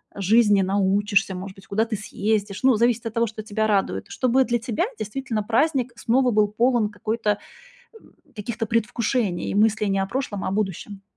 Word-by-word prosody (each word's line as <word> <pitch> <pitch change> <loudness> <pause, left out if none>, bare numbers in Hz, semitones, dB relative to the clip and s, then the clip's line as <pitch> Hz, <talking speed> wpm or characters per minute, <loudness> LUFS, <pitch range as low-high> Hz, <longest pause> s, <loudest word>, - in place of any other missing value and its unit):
жизни 205 0 +4
научишься, 200 +1 +1
может 190 +1 -7
быть, 195 - -17
куда 215 +3 +1
ты 225 -1 -3
съездишь. 210 0 -2
Ну, 260 -2 +5
зависит 235 +1 +1
от 225 - -4
того, 230 +1 +1
что 215 0 -7
тебя 215 +1 -1
радует. 190 - 0
Чтобы 255 +1 +2
для 240 -1 +1
тебя, 235 +7 -1
действительно, 220 0 -3
праздник 255 +2 +1
снова 250 +2 +2
был 210 -1 +3
полон 230 +1 +1
какой-то 215 +2 -3 0.7
э, 445 - -13 0.4
каких-то 225 +2 -4
предвкушений 225 -2 -1
и - - -3
мыслей 215 0 +2
не 195 - +1
о 195 - 0
прошлом, 205 -2 -3
а - - -1
о - - -2
будущем. 195 0 -3
215 Hz, 185 wpm, -23 LUFS, 200-235 Hz, 0.7 s, Ну